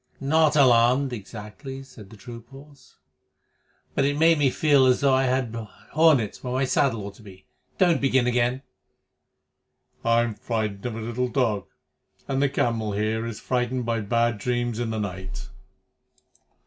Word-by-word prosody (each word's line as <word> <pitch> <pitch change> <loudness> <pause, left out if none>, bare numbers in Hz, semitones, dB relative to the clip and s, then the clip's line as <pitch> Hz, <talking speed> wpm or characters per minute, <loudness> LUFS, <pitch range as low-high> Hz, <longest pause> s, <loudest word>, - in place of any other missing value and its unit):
"Not 155 +2 +2
alarmed, 130 0 +4
exactly," 115 +5 -8
said 125 -7 -14
the 110 - -14
troop 115 0 -11
horse, 140 0 -16 1.0
"but - - +1
it 145 +1 0
made 165 0 +4
me 140 -2 +4
feel 140 -1 +3
as 125 - +3
though 140 -1 +3
I 130 0 +3
had 130 -2 0 0.4
hornets 150 -9 +3
where 125 -1 -3
my 130 +1 +1
saddle 130 -6 +1
ought 100 - -7
to - - -16
be. 95 -3 -14 0.3
Don't 175 -4 +3
begin 130 -2 +2
again." 125 +2 0 1.4
"I'm 115 0 +2
frightened 110 -1 -3
of 115 - -5
a - - -5
little 120 +3 -2
dog, 115 -7 0 0.6
and 135 0 -1
the 140 - +3
camel 115 -5 -1
here 110 +2 -1
is 115 -2 -6
frightened 125 0 -1
by 115 -1 0
bad 115 +1 0
dreams 120 0 -2
in 120 -1 -2
the 110 -1 -3
night." 95 -2 -6
120 Hz, 160 wpm, -25 LUFS, 110-135 Hz, 1.4 s, alarmed